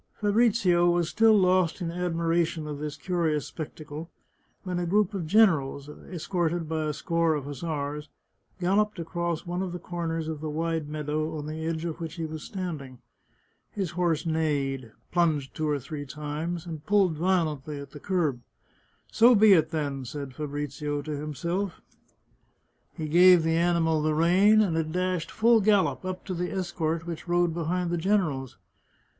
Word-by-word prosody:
Fabrizio 205 -5 +3
was 175 -1 +1
still 225 -1 +5
lost 185 -2 +3
in 170 -3 -3
admiration 170 -2 0
of 150 -1 -5
this 150 -1 -5
curious 165 -5 0
spec 155 -3 -7
tacle, 155 +1 -8 0.6
when 180 -2 -2
a 175 - -2
group 205 +2 +2
of 180 -5 -3
generals, 155 -9 +3
escorted 170 +1 -3
by 160 0 -1
a 150 - -1
score 165 +2 +1
of 145 -2 -4
hus 145 -2 -7
sars, 150 -2 -4 0.5
galloped 205 +3 +1
across 170 0 -3
one 175 +1 -3
of 185 -2 -3
the - - -3
corners 165 -2 -3
of 155 -2 -4
the 155 - -3
wide 160 0 -2
meadow 155 +1 -2
on 150 - -5
the 155 +1 -5
edge 165 0 -2
of 165 -2 -4
which 165 0 -5
he 165 -2 -3
was 155 0 -6
standing. 155 -10 -6 0.7
His 190 -6 -3
horse 175 -2 0
neighed, 140 -6 -1 0.2
plunged 155 -6 +1
two 155 -1 -2
or 145 - +1
three 145 +1 -7
times, 150 +4 -4
and 160 -3 -7
pulled 195 -3 +3
violently 155 -4 0
at 140 -1 -9
the 145 - -10
curb. 155 -9 0 0.4
" - - -37 0.3
So 235 +2 +6
be 210 -1 +7
it, 160 -3 +4
then," 145 -4 -3
said 140 +1 -6
Fabrizio 145 0 -4
to 155 - -6
himself. 170 +6 -3 1.1
He 155 - -5
gave 175 +2 +7
the 160 0 +1
animal 165 -2 +2
the 155 0 +1
rein, 190 +7 +5
and 185 -6 +1
it 160 -1 -1
dashed, 180 -1 -1
full 230 0 +4
gallop, 205 -2 +2
up 185 0 -5
to 190 - -3
the 180 0 -3
escort 170 -3 -2
which 170 0 -6
rode 175 -1 +2
behind 170 +1 -1
the 175 - 0
generals. 165 - 0
165 Hz, 175 wpm, -27 LUFS, 150-180 Hz, 1.1 s, be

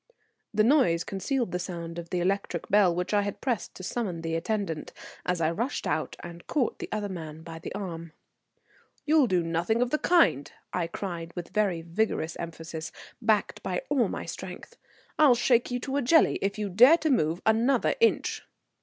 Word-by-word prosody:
The 215 0 +3
noise 220 - +4
concealed 235 +3 -2
the 180 - -2
sound 170 -2 -5
of 170 0 -8
the 180 - -1
electric 190 -2 -1
bell 195 -4 +4
which 180 +3 -2
I 205 - +4
had 205 -1 -4
pressed 240 -8 -2
to 185 - -9
summon 185 -5 -3
the 165 0 -3
attendant, 165 -2 -2 0.3
as 180 -1 +1
I 160 0 +2
rushed 235 +11 -2
out - - -1
and 170 0 -10
caught 275 -6 0
the - - -6
other 210 -1 -2
man 160 -4 -7
by 165 -1 -8
the - - -7
arm. 170 -5 -6 0.9
"You'll 305 -3 +4
do 180 -4 +2
nothing 170 +7 0
of 245 0 +1
the 305 - +1
kind," 330 - +3 0.2
I 175 -2 0
cried 170 -2 -5
with 175 -2 -6
very 195 -6 0
vigorous 170 -2 -1
emphasis, 160 -1 -6 0.3
backed 220 -2 +1
by - - -3
all - - +3
my - - -5
strength. - - -8 0.4
"I'll 290 -5 +7
shake 240 0 +2
you 245 0 -2
to 270 +1 -2
a - - +2
jelly 310 +6 +4
if 195 +1 -1
you 210 -1 -2
dare 250 - +7
to 315 -2 0
move 165 - +1
another 235 +4 +3
inch." 460 - +2
195 Hz, 190 wpm, -27 LUFS, 170-235 Hz, 0.9 s, I'll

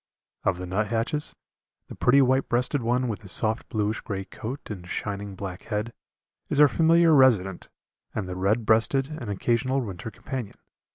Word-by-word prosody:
Of 95 -3 +1
the 90 - -5
nuthatches, 115 - -1 0.5
the - - -9
pretty 135 +3 +4
white 130 +1 +2
breasted 125 +3 +1
one 125 +2 +1
with 110 -2 -4
his 95 -4 -3
soft 110 +4 +1
bluish 110 -1 -1
grey 95 -2 -4
coat 125 +5 -7
and 90 -4 -7
shining 100 +1 -4
black 95 -1 -7
head, 110 +1 -3 0.6
is 145 - 0
our 150 - +9
familiar 165 +4 +4
resident 110 - +3 0.5
and 105 -4 -2
the 90 - -5
red 105 +5 +1
breasted 120 +5 +3
an 115 - -5
occasional 120 +6 0
winter 100 -4 -5
companion. 130 -1 -6
115 Hz, 165 wpm, -26 LUFS, 100-130 Hz, 0.6 s, our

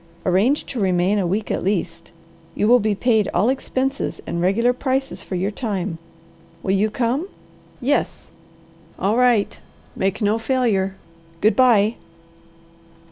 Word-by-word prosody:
Arrange 200 +11 +2
to 255 - -5
remain 190 +1 +2
a 185 - 0
week 205 +4 -2
at - - -2
least. 175 -3 -2 0.4
You 210 - +1
will 245 +2 +6
be 215 -1 0
paid 220 -2 +2
all 200 +7 +3
expenses 270 +1 -2
and 170 - -3
regular 230 +7 +2
prices 265 +1 -2
for 185 - -6
your 190 +3 -1
time. 195 -6 -3 0.6
Will 190 - 0
you 205 +2 +2
come?" 250 - -1 0.5
"Yes." 285 +3 -1 0.7
"All 200 +3 +1
right. 240 - +2 0.4
Make 190 0 -1
no 210 +1 +1
failure. 225 -6 0 0.4
Good 215 +4 +3
bye." 230 -4 +4
215 Hz, 135 wpm, -21 LUFS, 190-245 Hz, 0.7 s, will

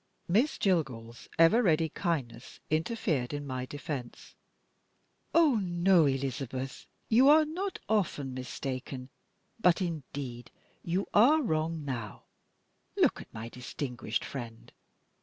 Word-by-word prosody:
Miss 230 - +2
Jillgall's 125 - -1
ever 165 +9 +6
ready 160 -6 +3
kindness 135 -10 -3
interfered 155 - 0
in 145 0 -4
my 130 -1 -4
defense: 145 -4 -6 1.0
"Oh, 305 -9 +4
no, 175 -2 +4
Elizabeth! 135 -1 -3 0.2
You 250 +5 +6
are 310 +1 +7
not 370 +6 -3
often 160 -11 0
mistaken; 130 0 -5 0.5
but 180 -5 +4
indeed 140 - -5 0.3
you 180 +4 -1
are 285 +9 +6
wrong 160 - -1
now. 120 -7 -5 0.7
Look - - +3
at - - -14
my 110 0 -6
distinguished 125 -1 -4
friend. 115 -4 -8
150 Hz, 110 wpm, -30 LUFS, 130-190 Hz, 1.0 s, are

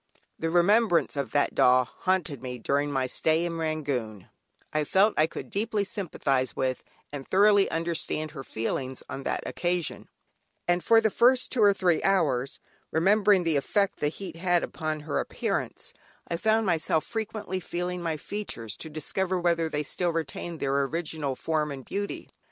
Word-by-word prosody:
The 165 - -1
remembrance 175 +2 +3
of 140 - -2
that 145 - +2
doll 125 0 +5
haunted 170 -2 -1
me 125 -1 -5
during 145 +5 0
my 135 -2 0
stay 160 +5 +1
in 165 -1 -3
Rangoon; 140 - -3 0.4
I 155 0 +1
felt 195 +8 +3
I 155 - +4
could - - -8
deeply 215 0 0
sympathise 140 - -1
with, 130 -1 -1 0.3
and 140 -2 -6
thoroughly 200 +1 +5
understand 165 -2 -1
her 135 -4 -7
feelings 130 +3 -3
on 135 - -6
that - - -1
occasion; 175 -1 -2 0.6
and 175 0 +2
for 225 0 +6
the 220 -1 +2
first 250 +3 +4
two 250 - +1
or 205 -1 +7
three 180 -4 +2
hours, 140 -10 +1 0.3
remembering 195 +3 +4
the 165 -3 +2
effect 200 +8 0
the 150 - +1
heat 165 +2 -6
had 175 0 +2
upon 155 -1 -3
her 150 0 -2
appearance, - - -3 0.3
I 170 - -2
found 220 +3 +2
myself 160 -3 +1
frequently 215 -4 -3
feeling 180 +1 -3
my 165 -2 -2
features 115 - -5
to 160 - -8
discover 180 +5 -1
whether 170 -2 +1
they 150 -1 -1
still 175 +4 -1
retained 165 +1 -4
their 140 +1 +1
original 150 -1 -2
form 155 +1 -1
and 135 -2 -7
beauty. 200 0 -4
165 Hz, 165 wpm, -27 LUFS, 145-190 Hz, 0.6 s, or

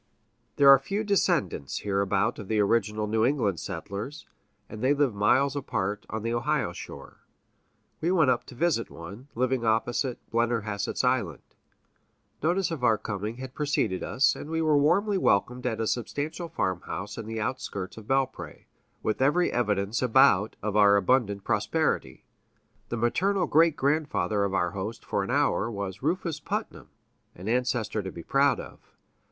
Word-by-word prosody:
There 140 - +4
are 135 - +8
few 195 +10 -3
descendants 175 - 0
hereabout 100 +3 0
of 105 - -8
the 110 0 0
original 105 0 +1
New 110 +1 +1
England 115 - +1
settlers, 105 +9 -6 0.4
and 110 - -9
they 135 +3 +3
live 140 -5 +2
miles 130 +8 +2
apart 105 -7 -3
on 110 -1 -4
the 115 0 -1
Ohio 120 -6 0
shore. - - -10 0.8
We 165 - 0
went 160 -8 +4
up - - 0
to - - -12
visit 150 -5 0
one, 100 +11 -10
living 130 0 0
opposite 120 +3 0
Blennerhassett's 110 -3 -1
Island. 120 - 0 1.0
Notice 175 +3 +1
of 155 -6 -5
our 115 -3 +4
coming 105 +2 -4
had 130 0 -8
preceded 140 -11 -1
us, 130 -2 +2
and 150 - -8
we 160 0 -1
were 155 -2 +3
warmly 190 +8 +3
welcomed 125 - +1
at 115 -2 -2
a 115 - 0
substantial 145 +9 -3
farmhouse 95 - -3
in 115 -2 -7
the 115 0 -4
outskirts 105 -5 -4
of 110 -1 -11
Belpré, 130 - -2 0.4
with 110 - -1
every 150 +7 +3
evidence 105 -2 0
about 110 -5 +4
of 105 -1 -2
abundant 100 +1 +3
prosperity. 105 - -1 0.6
The 120 - -3
maternal 180 - +1
great 160 +1 +4
grandfather 140 -8 0
of 95 -1 -2
our 90 -2 +1
host 105 +5 -6
for 100 - -1
an 95 - -6
hour 135 -4 +1
was 100 -3 -5
Rufus 165 +1 -1
Putnam, - - -5 0.5
an 90 +3 -9
ancestor 120 -2 0
to 95 -1 -6
be 85 - -9
proud 140 - +2
of. - - -10
115 Hz, 160 wpm, -27 LUFS, 105-140 Hz, 1.0 s, are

